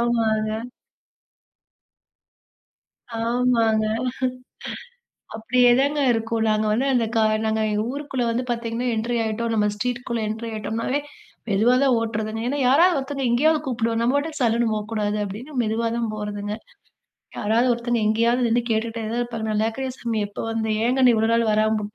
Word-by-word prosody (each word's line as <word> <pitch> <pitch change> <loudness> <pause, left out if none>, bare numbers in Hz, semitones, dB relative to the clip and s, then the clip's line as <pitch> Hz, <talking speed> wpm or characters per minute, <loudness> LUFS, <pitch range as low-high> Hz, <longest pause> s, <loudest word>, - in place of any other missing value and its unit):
ஆமாங்க. 220 -2 +1 2.6
ஆமாங்க. 230 -2 +2 1.5
அப்டியேதாங்க 250 +5 +3
இருக்கும். 225 0 -1
நாங்க 215 0 +1
வந்து 245 +6 +1
அந்த 240 -2 +3
கா 225 - +4 0.2
நாங்க 220 0 0 0.3
ஊருக்குள்ள 275 -2 -3
வந்து 235 +2 -1
பார்த்தீங்கன்னா 235 +1 -2
என்ட்ரி 235 +2 -1
ஆயிட்டோம், 230 +1 -2
நம்ம 210 -1 +2
ஸ்ட்ரீட்குள்ள 240 0 -2
என்ட்ரி 225 +2 -4
ஆயிட்டோம்னாவே 225 +5 -2 0.5
மெதுவா 220 +5 +3
தான் 270 -2 +4
ஓட்டுறதுங்க. 220 -1 -3
ஏன்னா 280 +4 -1
யாராவது 330 +8 +5
ஒருத்தவங்க 275 0 -3
எங்கேயாவது 305 +6 +3
கூப்பிடுவா. 230 -4 -1
நம்ம 235 +2 +2
பாட்டுக்கு 300 +1 -3
சல்லுனு 235 -1 +2
போக்கூடாது 210 -1 -2
அப்டினு 215 +9 -7
மெதுவா 225 +1 -1
தான் 235 -2 -1
போறதுங்க. 210 -1 -4 0.8
யாராவது 225 +4 +2
ஒருத்தங்க 235 0 -1
எங்கேயாவது 235 +3 +2
நின்னு 235 +1 +2
கேட்டுட்டே 225 +1 -1
தான் 240 +1 -1
இருப்பாங்க, 230 -2 -3
"நல்லாருக்கிறியா 225 +5 -1
சாமி, 230 -3 -2
எப்ப 205 - -8
வந்த? 225 0 -1 0.2
ஏங்கண்ணு 250 +1 +4
இவ்வளவு 225 0 +2
நாள் 230 0 +3
வராம 215 +1 +2
உட்ட" 210 +1 -9
230 Hz, 135 wpm, -23 LUFS, 220-245 Hz, 2.6 s, யாராவது